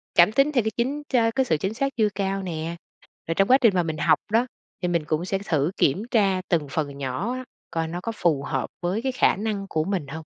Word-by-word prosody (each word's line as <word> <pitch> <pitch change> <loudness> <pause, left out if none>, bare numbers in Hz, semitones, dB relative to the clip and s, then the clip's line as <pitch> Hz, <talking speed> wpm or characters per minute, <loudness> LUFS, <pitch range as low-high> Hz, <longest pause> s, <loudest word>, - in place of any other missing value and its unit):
cảm 175 +4 +7
tính 275 +5 +3
theo 245 -6 +2
cái 220 - -1
chính 280 +5 -1
cha 230 -3 +3
cái 265 +2 +1
sự 160 - +1
chính 190 +7 -2
xác 275 +3 -2
chưa 215 -2 +4
cao 195 0 -1
nè. 165 -1 -4 0.5
Rồi 165 - -1
trong 195 - +3
quá 260 - +8
trình 215 -6 +5
mà 175 - +3
mình 160 -1 -3
học - - +3
đó, 235 +3 +3 0.3
thì 180 - 0
mình 170 -3 0
cũng 155 +3 -1
sẽ 195 0 -1
thử 155 +1 +1
kiểm 185 +10 +2
tra 195 -5 +3
từng 160 -5 +1
phần 145 -3 -2
nhỏ 140 - -2
á, 255 0 -5 0.3
coi 165 -1 -1
nó 175 +2 -4
có 230 - -2
phù 150 -5 +1
hợp 135 - -2
với 185 +6 -1
cái 265 0 -1
khả 250 - +3
năng 205 -1 -3
của 155 -1 0
mình 185 -7 -2
hông? 160 +2 -7
190 Hz, 260 wpm, -24 LUFS, 160-225 Hz, 0.5 s, quá